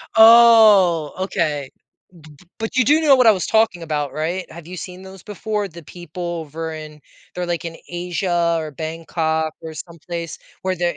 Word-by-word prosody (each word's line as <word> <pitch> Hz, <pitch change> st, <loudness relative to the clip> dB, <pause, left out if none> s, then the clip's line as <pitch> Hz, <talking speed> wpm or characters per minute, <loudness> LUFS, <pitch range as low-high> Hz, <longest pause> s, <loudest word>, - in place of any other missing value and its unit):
Oh, 220 Hz, -8 st, +6 dB
okay. 155 Hz, -7 st, -2 dB
B -, -, -65 dB, 0.5 s
B 175 Hz, -, -36 dB
But 225 Hz, +3 st, -5 dB
you 255 Hz, -, +4 dB
do 300 Hz, +3 st, +4 dB
know 295 Hz, -4 st, +5 dB
what 255 Hz, -2 st, +4 dB
I -, -, +9 dB
was 185 Hz, -, -2 dB
talking 220 Hz, -6 st, +1 dB
about, 150 Hz, -3 st, -3 dB
right, 170 Hz, +4 st, -3 dB
have 165 Hz, 0 st, -11 dB
you 180 Hz, +1 st, -8 dB
seen 180 Hz, +1 st, -8 dB
those 190 Hz, -1 st, -12 dB
before? 210 Hz, 0 st, -4 dB
The 170 Hz, 0 st, -12 dB
people 175 Hz, +2 st, -10 dB, 0.2 s
over 160 Hz, +2 st, -6 dB
in 155 Hz, -1 st, -10 dB, 0.3 s
they're 180 Hz, 0 st, -3 dB
like 170 Hz, -1 st, -3 dB
in 165 Hz, -1 st, -6 dB
Asia 175 Hz, -1 st, -1 dB
or 155 Hz, -1 st, -5 dB
Bangkok 160 Hz, +1 st, -3 dB
or 160 Hz, -1 st, -8 dB
someplace 170 Hz, +1 st, -7 dB, 0.2 s
where 185 Hz, 0 st, -1 dB
they're 175 Hz, 0 st, -1 dB
175 Hz, 180 wpm, -20 LUFS, 160-195 Hz, 0.5 s, I